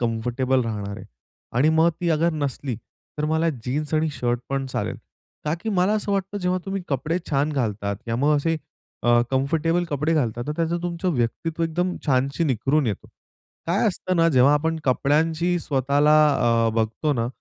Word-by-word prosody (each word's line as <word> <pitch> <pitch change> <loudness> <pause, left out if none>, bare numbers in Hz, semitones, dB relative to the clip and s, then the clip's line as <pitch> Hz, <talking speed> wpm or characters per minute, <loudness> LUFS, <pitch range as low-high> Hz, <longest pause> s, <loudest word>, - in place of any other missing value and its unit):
Comfortable 125 +3 0
राहणार 100 -3 -4
आहे. - - -9 0.5
आणि 145 +5 +4
मग 165 - +6
ती 175 - 0
अगर 165 +2 +2
नसली 140 -4 -3 0.4
तर 150 - 0
मला 160 +1 +2 0.2
जीन्स 150 +4 -2
आणि 155 0 +2
शर्ट 120 -3 -1
पण 135 0 -1
चालेल. 130 - -3 0.5
का 150 +1 0
की 225 - -4
मला 190 +1 +2
असं 210 -1 -1
वाटतं 195 +1 -2
जेव्हा 180 -1 0
तुम्ही 195 -1 -3
कपडे 150 +6 -1
छान 145 +2 +1
घालतात 105 -6 -1
या 115 - 0
मग 145 +4 +3
असे 165 +3 0 0.5
अ, 120 0 +5
कम्फर्टेबल 160 +6 +1
कपडे 150 0 -1
घालतात, 120 -5 0
तर 150 - -1
त्याचं 170 +1 0
तुमचं 175 +1 -1
व्यक्तित्व 155 +8 -2
एकदम 175 +3 0
छानशी 140 +4 +1
निखरून 135 +1 +1
येतो. 105 - -3 0.6
काय 190 +7 +2
असतं 185 -2 -1
ना 165 0 +4
जेव्हा 135 -1 +5
आपण 160 +2 0
कपड्यांची 160 +6 +1
स्वतःला 145 +1 +2 0.5
अ, - - +3
बघतो 115 +7 0
ना, 115 -3 -1
150 Hz, 170 wpm, -23 LUFS, 130-165 Hz, 0.6 s, मग